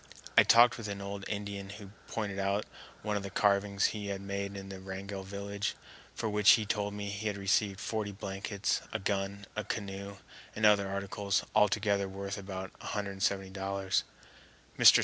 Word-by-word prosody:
I -, -, +10 dB
talked 120 Hz, +1 st, +6 dB
with 110 Hz, -, -4 dB
an 100 Hz, -1 st, -4 dB
old 100 Hz, 0 st, -5 dB
Indian 100 Hz, -1 st, -4 dB
who 100 Hz, -1 st, -9 dB, 0.2 s
pointed 100 Hz, -3 st, -3 dB
out 100 Hz, +2 st, +1 dB, 0.4 s
one 105 Hz, -1 st, 0 dB
of 100 Hz, -, 0 dB
the 100 Hz, -, -5 dB
carvings 100 Hz, 0 st, +2 dB
he 105 Hz, -2 st, -4 dB
had 100 Hz, -1 st, -2 dB
made 100 Hz, 0 st, -4 dB
in 95 Hz, 0 st, -7 dB
the 95 Hz, -1 st, -7 dB
Wrangell 95 Hz, +1 st, -6 dB
village, 100 Hz, +1 st, -3 dB, 0.4 s
for 115 Hz, -, -2 dB
which 105 Hz, 0 st, +7 dB
he 110 Hz, -, +2 dB
told 105 Hz, -1 st, -1 dB
me 100 Hz, -1 st, -4 dB
he 100 Hz, +2 st, -3 dB
had 100 Hz, -1 st, -1 dB
received 100 Hz, 0 st, +1 dB
forty 110 Hz, -1 st, -2 dB
blankets, 100 Hz, +1 st, -2 dB
a -, -, 0 dB
gun, 100 Hz, 0 st, -2 dB
a 105 Hz, -, -1 dB
canoe, 100 Hz, -1 st, -4 dB, 0.4 s
and 110 Hz, -, +2 dB
other 100 Hz, -2 st, +6 dB
articles, 100 Hz, 0 st, -1 dB
all 105 Hz, -, +6 dB
together 100 Hz, -1 st, +1 dB
worth 100 Hz, +1 st, -4 dB
about 95 Hz, -1 st, -6 dB
$170. 95 Hz, -1 st, -1 dB, 0.8 s
Mr. -, -, +10 dB
100 Hz, 170 wpm, -32 LUFS, 100-105 Hz, 0.8 s, I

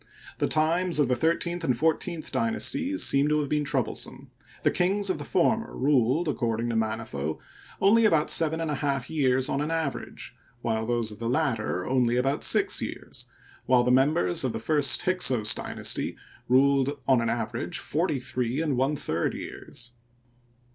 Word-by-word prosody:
The -, -, +1 dB
times 165 Hz, +3 st, +1 dB
of 145 Hz, -4 st, +2 dB
the 125 Hz, -, +2 dB
thirteenth 170 Hz, +5 st, -1 dB
and 125 Hz, -6 st, 0 dB
fourteenth 160 Hz, +2 st, -1 dB
dynasties 270 Hz, +5 st, -1 dB
seem 140 Hz, +2 st, +3 dB
to 150 Hz, 0 st, +2 dB
have 145 Hz, -2 st, -3 dB
been 150 Hz, 0 st, 0 dB
troublesome. 145 Hz, -, -2 dB, 0.3 s
The -, -, +3 dB
kings 195 Hz, +2 st, +1 dB
of 155 Hz, -, -4 dB
the -, -, -5 dB
former 220 Hz, +9 st, 0 dB
ruled, 135 Hz, +4 st, +2 dB
according 120 Hz, -4 st, -1 dB
to 115 Hz, -, -2 dB
Manetho, 110 Hz, -10 st, -3 dB, 0.4 s
only 220 Hz, +4 st, +4 dB
about 160 Hz, -7 st, +2 dB
seven 160 Hz, 0 st, +3 dB
and 165 Hz, -2 st, -2 dB
a 145 Hz, -, -3 dB
half 140 Hz, -3 st, -2 dB
years 130 Hz, -4 st, +2 dB
on 140 Hz, -, -1 dB
an 150 Hz, -, -2 dB
average, 160 Hz, -4 st, -4 dB, 0.3 s
those 115 Hz, 0 st, -1 dB
of 105 Hz, -, -11 dB
the 115 Hz, 0 st, -3 dB
latter 120 Hz, -, -1 dB
only 125 Hz, -2 st, +1 dB
about 135 Hz, +3 st, 0 dB
six -, -, +3 dB
years, -, -, -7 dB, 0.4 s
while 125 Hz, -1 st, +4 dB
the 125 Hz, -, +1 dB
members 130 Hz, -, +2 dB
of 130 Hz, -, -1 dB
the -, -, -4 dB
first 140 Hz, +1 st, +2 dB
Hyksos 125 Hz, -12 st, +3 dB
dynasty -, -, -2 dB, 0.3 s
ruled 140 Hz, +2 st, +3 dB
on 130 Hz, -3 st, +4 dB
an 115 Hz, -, -1 dB
average 115 Hz, 0 st, -3 dB
forty 155 Hz, -1 st, -1 dB
three 125 Hz, 0 st, -3 dB
and 155 Hz, -4 st, 0 dB
one 135 Hz, +4 st, +1 dB
third 85 Hz, -, -2 dB
years. 120 Hz, -1 st, -8 dB
140 Hz, 170 wpm, -26 LUFS, 120-160 Hz, 0.4 s, only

